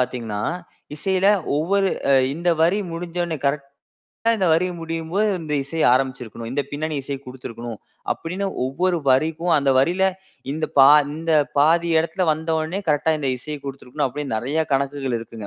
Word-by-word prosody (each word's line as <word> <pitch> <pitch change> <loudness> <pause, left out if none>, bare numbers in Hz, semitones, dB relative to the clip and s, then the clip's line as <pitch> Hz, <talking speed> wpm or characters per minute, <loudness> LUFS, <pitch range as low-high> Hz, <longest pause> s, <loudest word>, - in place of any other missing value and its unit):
பார்த்தீங்கன்னா, 115 -5 -2 0.5
இசையில 190 +3 +1 0.3
ஒவ்வொரு 195 +5 +2 0.5
இந்த 175 +2 -2
வரி 180 +5 +3
முடிஞ்சோனே 170 -1 -3
கரெக்ட்டா 140 0 -2 0.6
இந்த 190 -4 +1
வரி 165 +3 +3
முடியும்போது, 165 +5 -1
இந்த 150 -2 -3
இசை 160 +3 -4
ஆரம்பிச்சிருக்கணும். 125 -4 -3
இந்தப் 140 +1 -3
பின்னணி 155 +2 -3
இசையை 135 0 -4
குடுத்திருக்கணும் 120 -3 -7 0.3
அப்படின்னு, 185 +4 -4 0.2
ஒவ்வொரு 175 +7 0
வரிக்கும் 160 +6 +2
அந்த 140 -1 +2
வரியில 175 +8 +2 0.5
இந்த 155 +1 -2
பா 135 +1 +9 0.3
இந்த 165 +1 -2 0.3
பாதி 170 +3 +4
இடத்துல 170 +3 0
வந்தோனே 160 +3 -2
கரெக்ட்டா 150 +2 +2
இந்த 140 - -1
இசையை 150 +3 -6
குடுத்திருக்கணும் 135 +1 -3
அப்படின்னு 140 -3 -4
நிறைய 140 +8 -1
கணக்குகள் 135 -2 0
இருக்குங்க. 115 -2 -9
150 Hz, 140 wpm, -22 LUFS, 135-170 Hz, 0.6 s, பா